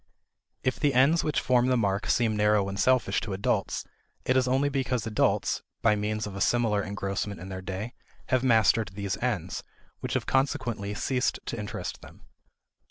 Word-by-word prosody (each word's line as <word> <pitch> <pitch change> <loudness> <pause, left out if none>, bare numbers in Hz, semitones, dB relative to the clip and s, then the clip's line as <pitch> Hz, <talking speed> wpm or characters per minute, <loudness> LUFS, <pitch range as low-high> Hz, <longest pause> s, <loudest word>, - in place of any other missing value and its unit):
If 130 -1 0
the 140 -3 +2
ends 140 +6 +4
which 150 -2 +1
form 125 -1 +3
the 130 -1 +3
mark 100 -3 0
seem 115 -3 +2
narrow 105 -1 +3
and 100 0 -4
selfish 130 0 +2
to 105 - -4
adults, 95 +2 -1 0.4
it 130 - +2
is 130 -1 +3
only 135 +3 +2
because 130 -4 -1
adults 110 -2 +1 0.2
(by 110 -2 +5
means 105 +1 -2
of 100 -2 -7
a 100 - -5
similar 115 -1 +2
engrossment 100 0 -3
in 95 +3 -8
their 95 0 -5
day) 95 +5 -5 0.4
have 130 -1 +2
mastered 110 -4 +3
these 100 -1 -2
ends, 100 -9 -2 0.4
which - - -3
have - - 0
consequently 120 -7 0
ceased 125 +3 0
to - - -3
interest 105 -3 -5
them. - - -14
110 Hz, 175 wpm, -28 LUFS, 100-130 Hz, 0.4 s, by